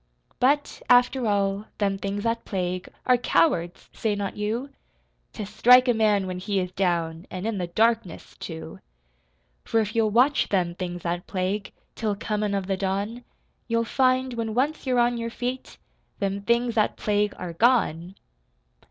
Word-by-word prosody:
But, 285 +4 +1
after 245 0 +4
all, 200 0 0
them 195 -2 0
things 200 +1 -3
that 230 0 -1
plague 180 -2 -3 0.2
Are 250 -1 +5
cowards 180 - +1
Say 215 -2 -1
not 200 -1 -3
you? 225 +7 -3 0.6
To 210 - -5
strike 245 +5 +6
a 245 - +4
man 210 -3 +2
when 185 -1 -4
he 200 +1 -1
is 180 -1 -3
down, 170 -3 -1
An' 185 +2 -5
in 220 -3 -1
the 175 - -2
darkness, 220 -1 0
too. 160 -2 -7 0.8
For 225 - +1
if 215 0 -2
you'll 225 -1 +3
watch 250 +7 +3
them 180 -3 +1
things 175 -1 -5
that 175 +1 -3
plague, 195 +2 -2 0.2
Till 215 -3 -2
comin' 210 -1 -2
of 195 -1 -2
the 195 0 -1
dawn, 200 +5 -2 0.4
You'll 230 0 +1
find, 255 +1 +2
when 225 -2 -3
once 280 +3 0
you're 250 -1 +2
on 240 0 +3
your 230 0 -3
feet, 250 +2 -5 0.4
Them 200 0 -2
things 235 +2 +1
that 215 -2 +1
plague 210 0 0
are 175 -2 -6
gone! 185 -5 +2
210 Hz, 165 wpm, -25 LUFS, 190-235 Hz, 0.8 s, strike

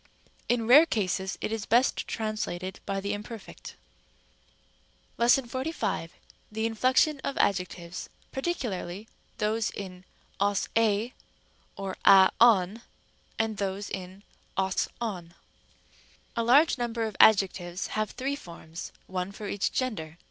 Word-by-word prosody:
In 240 -2 +2
rare 290 +8 +8
cases 190 - -1
it - - -2
is 220 -2 -3
best 240 +4 +2
translated 205 -4 -3
by 195 0 -1
the 200 +1 -2
imperfect. 210 +1 -8 1.4
§45. 260 - +1 0.4
The 220 +1 -2
inflection 255 +6 +2
of 275 - -4
adjectives, 180 -3 -1 0.2
particularly 225 - -3 0.3
those 215 +1 0
in 185 -2 -8 0.3
0S, 200 0 +1
ἢ 225 +2 +2 0.6
Or 195 -1 -5
α, 190 -1 +8
τον 220 -2 +5 0.6
and 220 -2 -1
those 200 +1 -3
in 190 +1 -7 0.3
ος, 190 -1 +1
ov. 225 -4 -2
Rem. 170 - -21 1.0
a. 230 - +1
A - - -2
large 280 +4 +5
number 235 -1 -1
of 220 -3 -3
adjectives 190 -4 +4
have 215 0 0
three 275 +2 -3
forms, 170 - -9
one 185 0 -3
for 205 +1 -7
each 200 0 -1
gender. 175 -11 -3
210 Hz, 125 wpm, -28 LUFS, 190-235 Hz, 1.4 s, rare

